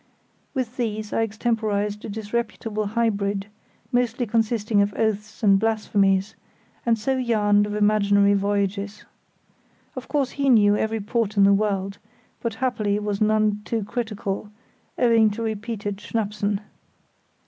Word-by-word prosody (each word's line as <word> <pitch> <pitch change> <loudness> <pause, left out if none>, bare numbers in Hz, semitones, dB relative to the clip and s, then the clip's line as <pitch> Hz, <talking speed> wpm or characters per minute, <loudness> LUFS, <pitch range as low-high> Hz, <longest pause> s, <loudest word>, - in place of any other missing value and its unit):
With 255 -2 -3
these 215 -3 -3
I - - +1
extemporised 215 -2 -1
a - - -6
disreputable 215 0 -3
hybrid, 205 -3 0 0.5
mostly 245 0 +1
consisting 220 -1 +1
of 200 0 0
oaths 215 0 -2
and 195 -2 +5
blasphemies, 200 -2 +1 0.5
and 230 -1 +4
so 260 +5 -1
yarned 205 -4 +2
of 210 - -4
imaginary 205 -1 +3
voyages. 200 0 -1 0.9
Of - - -7
course 280 -3 0
he 275 -1 0
knew 205 -4 +5
every 220 +1 -1
port 215 0 -1
in 200 - +6
the 200 0 +6
world, 200 -1 -1 0.4
but 230 -2 -2
happily 225 -5 0
was 210 -1 -3
none 215 -1 +2
too 225 0 -2
critical, 210 -2 -4 0.5
owing 230 -3 +4
to 220 +3 -4
repeated 215 -2 -3
_schnappsen. 205 -1 -2
210 Hz, 130 wpm, -24 LUFS, 205-225 Hz, 0.9 s, in